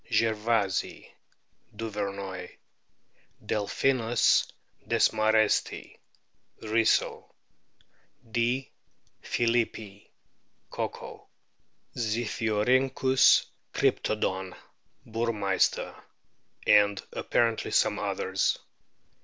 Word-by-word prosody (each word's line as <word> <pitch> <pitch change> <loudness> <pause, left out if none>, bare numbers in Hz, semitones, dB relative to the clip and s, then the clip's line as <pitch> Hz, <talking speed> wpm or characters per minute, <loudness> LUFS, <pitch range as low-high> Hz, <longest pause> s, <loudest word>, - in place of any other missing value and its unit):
gervaisii, 110 -3 0 0.7
Duvernoy; 100 -4 -5 1.0
Delpkinus 115 +3 +1 0.4
desma 110 0 +3
restii, 110 -1 +1 0.6
Risso; 110 +1 +1 1.0
D. 120 +3 0 0.5
plulippii, 115 -4 -1 0.6
Cocco; - - -6 0.7
Zipkiorhynchus 120 +3 +2 0.3
cryptodon, 95 -3 -1 0.5
Burmeister; 110 -4 0 0.7
and 100 -1 +4
apparently 115 -1 0
some - - +2
others. 95 +1 -1
110 Hz, 50 wpm, -28 LUFS, 100-115 Hz, 1.0 s, and